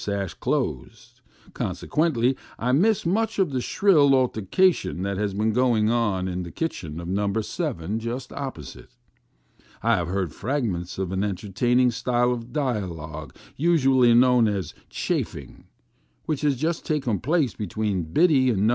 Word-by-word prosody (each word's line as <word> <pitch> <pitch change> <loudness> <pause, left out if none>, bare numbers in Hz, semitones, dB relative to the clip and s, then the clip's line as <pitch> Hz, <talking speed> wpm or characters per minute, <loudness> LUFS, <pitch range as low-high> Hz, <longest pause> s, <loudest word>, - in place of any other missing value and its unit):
233 100 -1 -2
sash, - - -9
closed; 60 -1 -3 0.3
consequently, 135 -5 0 0.2
I 125 +2 0
miss 200 +9 +3
much 220 +5 0
of 190 -6 +2
the 130 -2 -1
shrilly 150 -5 +4
altercation 120 - +1
that 100 0 -2
has 105 -2 -1
been 110 +2 +1
going 115 -3 +2
on 105 -6 0
in 90 0 -3
the 85 - -6
kitchen 85 - -4
of 85 - -7
No. 100 +2 0
7 110 - -3
just 120 +3 -5
opposite. 130 - -8 0.9
I - - +3
have 85 -2 -2
heard 90 -3 -2
frag 135 +5 -2
ments 90 -5 -3
of 95 -2 -2
an 95 +1 -1
entertaining 120 +6 +1
style 120 +1 +1
of 120 0 -5
dialogue 85 - -4 0.2
usually 135 -7 +4
known 125 -1 +5
as 95 -7 -2
" - - -37
chaffing," - - -3 0.6
which 155 -3 -2
has 145 -2 +2
just 160 +5 -2
taken 135 -9 -1
place 145 - +1
between 105 -3 -2
Biddy 140 - +4
in 105 -4 +1
No. - - +4
120 Hz, 155 wpm, -24 LUFS, 95-135 Hz, 0.9 s, known